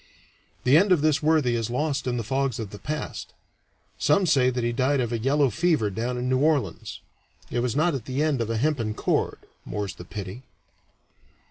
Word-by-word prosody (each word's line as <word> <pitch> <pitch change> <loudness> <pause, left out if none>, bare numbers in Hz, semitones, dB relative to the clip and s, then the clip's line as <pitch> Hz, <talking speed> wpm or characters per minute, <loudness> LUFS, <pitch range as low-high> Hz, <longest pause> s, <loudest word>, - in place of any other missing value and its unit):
The 130 +4 +6
end 195 +3 +3
of 175 -5 +5
this 155 -2 +3
worthy 150 -5 +3
is 115 -1 -1
lost 140 +1 -1
in 120 -1 0
the 115 - -2
fogs 135 +1 -1
of 110 -4 -5
the 105 - -9
past: 155 +1 -5 0.7
some 195 -1 +3
say 135 -6 +4
that 125 -1 -2
he 120 - +1
died 130 +4 +1
of 120 -1 -1
a 115 - -1
yellow 135 +2 +2
fever 140 - +1
down 120 +5 -2
in 125 +1 -2
New 130 0 +2
Orleans; 140 - 0 0.5
it 120 - 0
was 120 -1 -1
not 155 +3 +2
at 130 -5 -4
the 135 +3 -1
end 150 -5 +1
of 115 - -2
a 115 - -1
hempen 115 -5 0
cord, - - 0 0.3
more's 105 -2 -4
the - - -10
pity. 100 +4 -7
125 Hz, 205 wpm, -25 LUFS, 115-150 Hz, 0.7 s, The